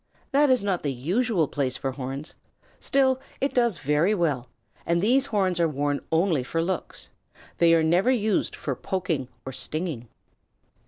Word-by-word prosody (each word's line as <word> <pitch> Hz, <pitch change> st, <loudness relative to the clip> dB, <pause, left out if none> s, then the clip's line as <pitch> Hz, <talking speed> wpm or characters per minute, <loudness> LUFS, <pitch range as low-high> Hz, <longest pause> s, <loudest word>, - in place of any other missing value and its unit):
That 285 Hz, +1 st, +4 dB
is 255 Hz, -5 st, +3 dB
not 195 Hz, -3 st, 0 dB
the 145 Hz, -, -1 dB
usual 175 Hz, -, 0 dB
place 135 Hz, -3 st, -2 dB
for 135 Hz, -, -2 dB
horns, 135 Hz, +3 st, -6 dB, 0.5 s
still 265 Hz, -1 st, +2 dB, 0.2 s
it 275 Hz, -, 0 dB
does 235 Hz, -7 st, +2 dB
very 150 Hz, +8 st, +2 dB
well, 145 Hz, -, -1 dB, 0.3 s
and 170 Hz, 0 st, +1 dB
these 255 Hz, +8 st, +3 dB
horns 190 Hz, -7 st, 0 dB
are 170 Hz, -, +4 dB
worn 145 Hz, 0 st, -1 dB
only 165 Hz, -3 st, +2 dB
for 150 Hz, +6 st, -3 dB
looks. 175 Hz, +1 st, -3 dB, 0.5 s
They 165 Hz, -1 st, +6 dB
are 165 Hz, -, +3 dB
never 175 Hz, +9 st, +3 dB
used 220 Hz, -5 st, +1 dB
for 140 Hz, -, -3 dB
poking 165 Hz, -8 st, -2 dB, 0.2 s
or 130 Hz, -, -5 dB
stinging. 155 Hz, -3 st, -4 dB
170 Hz, 160 wpm, -25 LUFS, 145-210 Hz, 0.5 s, They